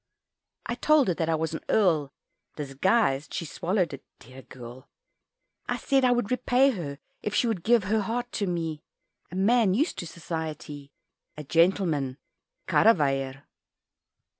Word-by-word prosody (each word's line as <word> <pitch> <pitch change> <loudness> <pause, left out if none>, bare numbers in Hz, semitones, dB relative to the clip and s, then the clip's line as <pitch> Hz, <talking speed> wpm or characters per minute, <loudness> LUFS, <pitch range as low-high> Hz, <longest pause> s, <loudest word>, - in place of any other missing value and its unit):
I - - -2
told 285 0 +3
her - - +2
that 165 0 -2
I 165 - +2
was 160 0 -2
an 160 - -5
Earl 160 -10 +2 0.4
Disguised 145 - 0
she 170 - -3
swallowed 175 +1 -1
it, 135 - -9
dear 130 +3 -13
girl 125 0 -12 0.8
I - - -1
said 270 -1 +1
I 250 - +4
would 245 -3 0
repay 255 +2 +3
her, 155 - -5 0.2
If 210 - -3
she - - +3
would 220 -7 -1
give 230 0 +4
her 215 +3 +1
heart 240 +3 -3
to 200 - -2
me, 165 -3 -3 0.5
A - - -7
man 205 0 +3
used 300 - 0
to 175 - -5
society, 155 -4 -6 0.5
A 150 - -6
gentleman 165 -4 +1 0.5
"Karreweijer." 135 -8 +2
175 Hz, 150 wpm, -27 LUFS, 145-225 Hz, 0.8 s, I